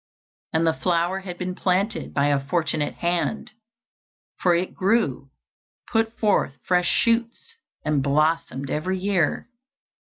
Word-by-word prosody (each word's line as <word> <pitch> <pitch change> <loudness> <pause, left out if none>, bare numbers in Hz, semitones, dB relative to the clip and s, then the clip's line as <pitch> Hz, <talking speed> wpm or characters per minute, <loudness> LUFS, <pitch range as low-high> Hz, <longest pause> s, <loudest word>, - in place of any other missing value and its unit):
And 160 +1 +2
the 160 - +3
flower 175 +2 0
had 180 -2 -7
been 185 0 -3
planted 195 +5 -1
by 140 +1 +2
a 140 -1 +1
fortunate 155 0 -1
hand, 175 +5 -1 0.9
for 175 -2 +4
it 180 +2 -1
grew, 185 - +1 0.6
put 225 0 +1
forth 205 -10 +2
fresh 180 -1 +2
shoots, 235 - 0 0.3
and 150 -2 +2
blossomed 150 -1 0
every 185 +5 -1
year. 185 -3 0
175 Hz, 125 wpm, -24 LUFS, 155-195 Hz, 0.9 s, for